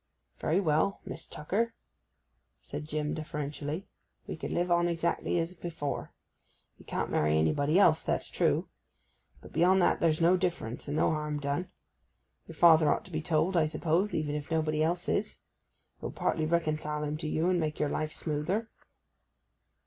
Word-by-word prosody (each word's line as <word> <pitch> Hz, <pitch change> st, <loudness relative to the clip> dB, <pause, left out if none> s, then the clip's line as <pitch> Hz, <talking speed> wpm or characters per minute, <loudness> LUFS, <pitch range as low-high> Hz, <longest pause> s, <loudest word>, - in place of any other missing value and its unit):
'Very 165 Hz, +5 st, +2 dB
well, 165 Hz, +2 st, +1 dB
Miss -, -, -7 dB
Tucker,' 220 Hz, +10 st, -2 dB, 0.8 s
said 150 Hz, -, -7 dB
Jim 150 Hz, -1 st, -2 dB
deferentially. 150 Hz, +2 st, -4 dB, 0.4 s
'We -, -, -6 dB
can -, -, -4 dB
live 175 Hz, 0 st, 0 dB
on 175 Hz, 0 st, +4 dB
exactly 170 Hz, +1 st, 0 dB
as 165 Hz, +1 st, -1 dB
before. 165 Hz, -5 st, -4 dB, 0.7 s
We -, -, -16 dB
can't -, -, -2 dB
marry 75 Hz, +1 st, +2 dB
anybody 140 Hz, -, +2 dB
else, 165 Hz, -5 st, +5 dB
that's -, -, -1 dB
true; -, -, +1 dB, 0.7 s
but -, -, -13 dB
beyond 180 Hz, +4 st, +4 dB
that -, -, +3 dB
there's 160 Hz, -2 st, +2 dB
no 170 Hz, +2 st, +5 dB
difference, 170 Hz, -11 st, -3 dB
and 145 Hz, +2 st, -2 dB
no -, -, +3 dB
harm 150 Hz, -1 st, -2 dB
done. 145 Hz, +5 st, -2 dB, 0.8 s
Your 165 Hz, -, -10 dB
father 160 Hz, -2 st, +6 dB
ought -, -, -1 dB
to 185 Hz, -, -13 dB
be 155 Hz, -1 st, -2 dB
told, 160 Hz, +3 st, +1 dB
I 160 Hz, -3 st, +4 dB
suppose, 165 Hz, +6 st, 0 dB
even 150 Hz, -2 st, -1 dB
if 150 Hz, 0 st, -4 dB
nobody 155 Hz, -1 st, 0 dB
else 175 Hz, +3 st, 0 dB
is? 210 Hz, +1 st, 0 dB
It -, -, -41 dB
will -, -, -3 dB
partly 155 Hz, -1 st, 0 dB
reconcile 155 Hz, -2 st, 0 dB
him 150 Hz, 0 st, -2 dB
to 155 Hz, -, -4 dB
you, 160 Hz, +2 st, 0 dB
and 180 Hz, -1 st, +2 dB
make 155 Hz, -2 st, -2 dB
your 150 Hz, -, +1 dB
life 155 Hz, 0 st, -2 dB
smoother. 175 Hz, +11 st, -2 dB
155 Hz, 170 wpm, -30 LUFS, 150-175 Hz, 0.8 s, father